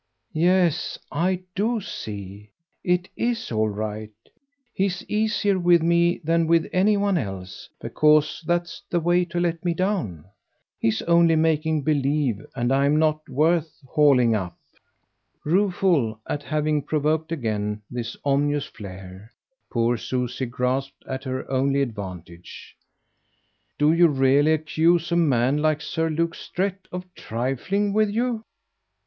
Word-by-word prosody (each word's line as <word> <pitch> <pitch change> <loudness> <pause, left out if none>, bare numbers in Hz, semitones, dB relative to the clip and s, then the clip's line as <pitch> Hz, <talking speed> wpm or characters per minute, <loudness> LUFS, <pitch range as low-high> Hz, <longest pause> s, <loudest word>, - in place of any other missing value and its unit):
"Yes 175 0 +2
I 180 +4 0
do 220 +4 0
see. 105 - -8 0.3
It 180 +1 +1
IS 235 - -2
all 110 -1 +1
right. 105 +1 -4 0.6
He's 190 -1 -1
easier 210 -2 +1
with 175 -2 +4
me 170 +1 +3
than 165 +1 +2
with 165 0 +3
any 205 +3 +3
one 200 -3 +1
else, 95 -6 -7
because 150 +2 +2
that's 175 0 -1
the 175 - +1
way 175 +2 +2
to 175 0 -3
let 170 -2 -1
me 175 -2 0
down. 170 - -2 0.5
He's 110 -1 0
only 170 -1 +4
making 160 -1 +1
believe, 140 -6 0
and 120 0 0
I'm 140 +2 +3
not 155 -1 +1
worth 155 +3 +1
hauling 130 -5 +4
up." 95 -5 -3 0.9
Rueful 175 - +1
at 145 - -2
having 150 0 0
provoked 155 +2 -1
again 105 -7 -2
this 120 -1 -5
ominous 145 +1 +1
flare, 95 +1 -11 0.4
poor 120 0 +1
Susie 125 +2 -3
grasped 125 +3 -2
at 130 +1 -5
her 130 0 -4
only 135 +1 +1
advantage. 95 - -6 1.0
"Do 150 +2 +4
you 170 +1 +6
really 140 +1 +3
accuse 160 +2 +1
a - - +2
man 135 -5 +2
like 155 0 +1
Sir 160 +2 -2
Luke 165 +2 0
Strett 190 +1 -4
of 180 0 -5
trifling 135 - -2
with 215 0 +3
you?" 230 +1 -1
155 Hz, 130 wpm, -24 LUFS, 125-175 Hz, 1.0 s, you